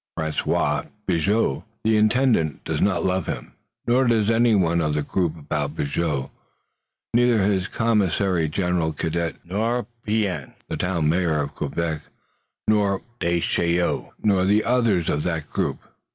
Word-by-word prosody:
François 80 Hz, -2 st, 0 dB, 0.2 s
Bigot, 95 Hz, -3 st, +1 dB, 0.2 s
the 110 Hz, 0 st, +3 dB
Intendant, 110 Hz, -, +2 dB
does -, -, -2 dB
not 100 Hz, -, +2 dB
love 95 Hz, 0 st, 0 dB
him, -, -, -5 dB, 0.3 s
nor 125 Hz, +2 st, +3 dB
does 115 Hz, -2 st, +3 dB
anyone 100 Hz, -8 st, +3 dB
of 75 Hz, -2 st, 0 dB
the 75 Hz, -, 0 dB
group 85 Hz, +1 st, -1 dB
about 75 Hz, 0 st, -3 dB
Bigot, 70 Hz, -2 st, -1 dB, 0.8 s
neither 120 Hz, -3 st, +4 dB
his 95 Hz, -1 st, +1 dB
commissary 95 Hz, -7 st, +1 dB
general, 90 Hz, -1 st, 0 dB
Cadet, 80 Hz, -1 st, -2 dB
nor 110 Hz, +6 st, -1 dB, 0.2 s
Pean, 100 Hz, -, -1 dB
the -, -, -3 dB
Town 90 Hz, -4 st, 0 dB
Mayor 80 Hz, -1 st, +2 dB
of 70 Hz, 0 st, -3 dB
Quebec, 80 Hz, -2 st, -2 dB, 0.7 s
nor 100 Hz, -3 st, +2 dB, 0.2 s
Descheneaux, 85 Hz, 0 st, 0 dB
nor 95 Hz, -3 st, +3 dB
the 105 Hz, +2 st, +3 dB
others 115 Hz, -9 st, +2 dB
of 75 Hz, -, 0 dB
that 80 Hz, -3 st, -2 dB
group. -, -, -1 dB
90 Hz, 135 wpm, -23 LUFS, 80-105 Hz, 0.8 s, neither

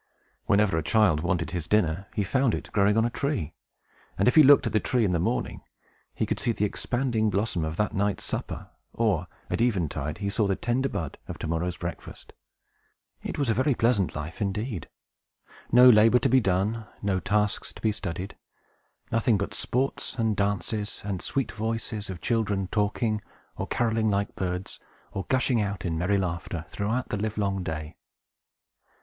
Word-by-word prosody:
Whenever 100 Hz, -5 st, +3 dB
a -, -, -1 dB
child 95 Hz, -3 st, +3 dB
wanted 85 Hz, -1 st, -1 dB
his 85 Hz, -3 st, -3 dB
dinner, 95 Hz, -2 st, +1 dB
he 105 Hz, -, +1 dB
found 130 Hz, +4 st, +2 dB
it -, -, -7 dB
growing 105 Hz, +1 st, +3 dB
on 115 Hz, -, +4 dB
a -, -, +1 dB
tree; 130 Hz, -, -2 dB, 0.6 s
and, 100 Hz, -, +2 dB
if 125 Hz, -, +5 dB
he 155 Hz, -, +8 dB
looked 145 Hz, 0 st, +7 dB
at -, -, -2 dB
the 110 Hz, -, +4 dB
tree 120 Hz, -1 st, +1 dB
in 95 Hz, -, +1 dB
the 85 Hz, -, +1 dB
morning, -, -, -1 dB, 0.5 s
he -, -, 0 dB
could -, -, -2 dB
see 120 Hz, -, +1 dB
the 105 Hz, -2 st, 0 dB
expanding 115 Hz, 0 st, 0 dB
blossom 100 Hz, -3 st, 0 dB
of 80 Hz, +1 st, -3 dB
that 105 Hz, -, 0 dB
night's 100 Hz, 0 st, 0 dB
supper; -, -, -5 dB, 0.2 s
or, 100 Hz, -7 st, +1 dB, 0.2 s
at -, -, 0 dB
eventide, 85 Hz, -, 0 dB
he 100 Hz, -, -3 dB
saw 105 Hz, +1 st, +1 dB
the 95 Hz, -, +1 dB
tender 130 Hz, +6 st, 0 dB
bud 80 Hz, -5 st, -4 dB
of -, -, -6 dB
to -, -, -5 dB
morrow's 85 Hz, +2 st, -1 dB
breakfast. 85 Hz, 0 st, -7 dB, 0.9 s
It -, -, -5 dB
was 140 Hz, -5 st, +1 dB
a -, -, +3 dB
very 130 Hz, +3 st, +2 dB
pleasant 115 Hz, -6 st, +1 dB
life 80 Hz, +8 st, -6 dB
indeed. 105 Hz, -, -3 dB, 0.8 s
No 125 Hz, +1 st, +8 dB
labor 115 Hz, 0 st, +7 dB
to 135 Hz, -, +1 dB
be 130 Hz, +1 st, +5 dB
done, 105 Hz, +3 st, 0 dB, 0.2 s
no 95 Hz, -2 st, +1 dB
tasks 105 Hz, +3 st, 0 dB
to -, -, -12 dB
be 110 Hz, -, +1 dB
studied; 95 Hz, -1 st, -5 dB, 0.8 s
nothing 115 Hz, -1 st, +3 dB
but 100 Hz, -, -3 dB
sports 130 Hz, +3 st, -1 dB
and 110 Hz, -3 st, +1 dB
dances, 100 Hz, +1 st, -1 dB
and 100 Hz, -3 st, -3 dB
sweet 135 Hz, -2 st, -1 dB
voices 110 Hz, -1 st, -3 dB
of 90 Hz, -3 st, -6 dB
children 105 Hz, -4 st, 0 dB
talking, 105 Hz, +1 st, 0 dB, 0.3 s
or -, -, -4 dB
carolling 115 Hz, -2 st, +1 dB
like 100 Hz, 0 st, 0 dB
birds, 90 Hz, 0 st, -3 dB, 0.3 s
or 95 Hz, -, -5 dB
gushing 125 Hz, -3 st, +2 dB
out 100 Hz, -2 st, -3 dB
in 85 Hz, -2 st, -1 dB
merry 90 Hz, +5 st, +1 dB
laughter, 85 Hz, -2 st, -3 dB
throughout 110 Hz, +5 st, -2 dB
the 105 Hz, -, -1 dB
livelong 100 Hz, -2 st, -1 dB
day. 80 Hz, -1 st, -5 dB
105 Hz, 180 wpm, -27 LUFS, 90-115 Hz, 0.9 s, he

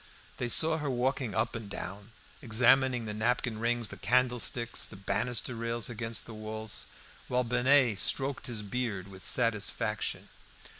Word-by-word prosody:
They 125 Hz, -, -2 dB
saw 160 Hz, +6 st, +5 dB
her 145 Hz, -2 st, -2 dB
walking 125 Hz, -3 st, -1 dB
up -, -, 0 dB
and 110 Hz, -3 st, -6 dB
down, 100 Hz, +1 st, -7 dB, 0.3 s
examining 125 Hz, +1 st, +3 dB
the 105 Hz, -, -3 dB
napkin 115 Hz, +1 st, 0 dB
rings, 120 Hz, -1 st, 0 dB
the -, -, -8 dB
candlesticks, 120 Hz, -1 st, 0 dB
the -, -, -9 dB
banister 120 Hz, +5 st, -1 dB
rails 115 Hz, 0 st, 0 dB
against 115 Hz, -1 st, -3 dB
the 115 Hz, -, -9 dB
walls, 110 Hz, 0 st, -4 dB, 0.4 s
while 125 Hz, 0 st, +1 dB
Binet 125 Hz, -2 st, +3 dB
stroked 135 Hz, 0 st, 0 dB
his 115 Hz, -4 st, -4 dB
beard 105 Hz, -4 st, -3 dB
with 95 Hz, -1 st, -11 dB
satisfaction. 115 Hz, -4 st, 0 dB
120 Hz, 145 wpm, -30 LUFS, 110-125 Hz, 0.4 s, saw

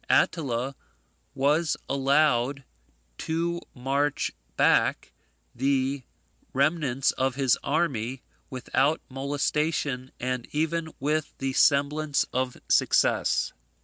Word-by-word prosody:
Attila 135 Hz, -4 st, +1 dB, 0.6 s
was 150 Hz, +4 st, +2 dB
allowed 135 Hz, -1 st, +2 dB, 0.6 s
to 170 Hz, +2 st, -1 dB
march 135 Hz, +3 st, 0 dB, 0.3 s
back -, -, +3 dB, 0.4 s
the 135 Hz, +1 st, 0 dB, 0.5 s
remnants 140 Hz, -2 st, +2 dB
of 130 Hz, -1 st, -1 dB
his 135 Hz, -3 st, +3 dB
army 135 Hz, -5 st, -1 dB, 0.3 s
without 135 Hz, +4 st, +1 dB
molestation, 140 Hz, -1 st, -1 dB
and 125 Hz, -1 st, -2 dB
even 160 Hz, +1 st, -1 dB
with 150 Hz, +2 st, -1 dB
the 135 Hz, 0 st, -2 dB
semblance 145 Hz, +2 st, +3 dB
of 130 Hz, 0 st, -1 dB
success. -, -, +2 dB
140 Hz, 85 wpm, -26 LUFS, 130-150 Hz, 0.6 s, back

